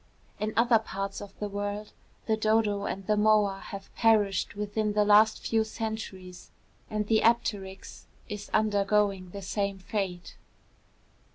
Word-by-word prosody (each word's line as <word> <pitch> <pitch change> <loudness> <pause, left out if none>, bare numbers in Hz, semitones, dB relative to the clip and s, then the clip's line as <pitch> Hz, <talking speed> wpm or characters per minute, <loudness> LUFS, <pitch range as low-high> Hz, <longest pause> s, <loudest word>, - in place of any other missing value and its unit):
In 215 +1 -1
other 230 -1 +5
parts 195 -2 -5
of 200 -1 -11
the 210 - -3
world, 205 +1 -4 0.3
the 220 - +2
dodo 215 -2 +1
and 195 0 -4
the 210 - +2
moa 210 -2 +3
have 195 -1 -9
perished 210 -5 +2
within 210 +1 -1
the 210 0 +3
last 210 +1 +5
few 225 -1 +2
centuries; 220 -5 -6 0.4
and 210 0 -1
the 220 +1 +3
apteryx 200 -4 -1 0.2
is 210 0 -7
undergoing 205 -3 +1
the 200 +2 -8
same 200 0 -2
fate. 185 -2 -4
210 Hz, 140 wpm, -28 LUFS, 195-215 Hz, 0.4 s, other